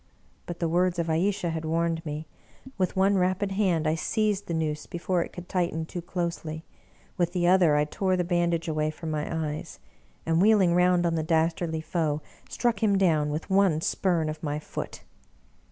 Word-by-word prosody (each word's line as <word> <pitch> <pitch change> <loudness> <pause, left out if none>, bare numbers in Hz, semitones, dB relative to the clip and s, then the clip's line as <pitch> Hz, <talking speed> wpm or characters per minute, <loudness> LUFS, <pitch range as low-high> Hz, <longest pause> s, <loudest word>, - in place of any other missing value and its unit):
But 175 - -5
the 170 - 0
words 175 +2 +1
of 165 -1 -1
Ayesha 180 +1 0
had 160 0 -4
warned 165 0 0
me; 150 +1 -4 0.5
with 185 -2 -1
one 195 +1 +3
rapid 185 +2 0
hand 185 -5 +1
I 155 - +2
seized 205 +4 0
the 170 - -2
noose 150 -2 -2
before 175 +1 -1
it - - -10
could 175 0 -9
tighten 170 -3 -1
too 175 +2 -6
closely, 170 -2 -4 0.5
with 175 -1 0
the 175 -2 +1
other 175 -4 +5
I 150 0 +3
tore 185 +4 0
the 180 - +1
bandage 170 -1 0
away 155 -1 0
from 160 +1 -6
my 150 -1 -2
eyes, 155 -2 -4 0.5
and, 165 +1 +2
wheeling 200 -4 +5
round 180 0 +3
on 170 - +1
the 160 - 0
dastardly 160 0 0
foe, 155 -2 -1 0.3
struck 235 -4 0
him 205 -3 +3
down 160 -6 +2
with 155 +6 -4
one 190 -5 +4
spurn 170 -1 0
of 155 0 -5
my 150 -2 -2
foot. 150 - -7
170 Hz, 185 wpm, -27 LUFS, 160-185 Hz, 0.5 s, other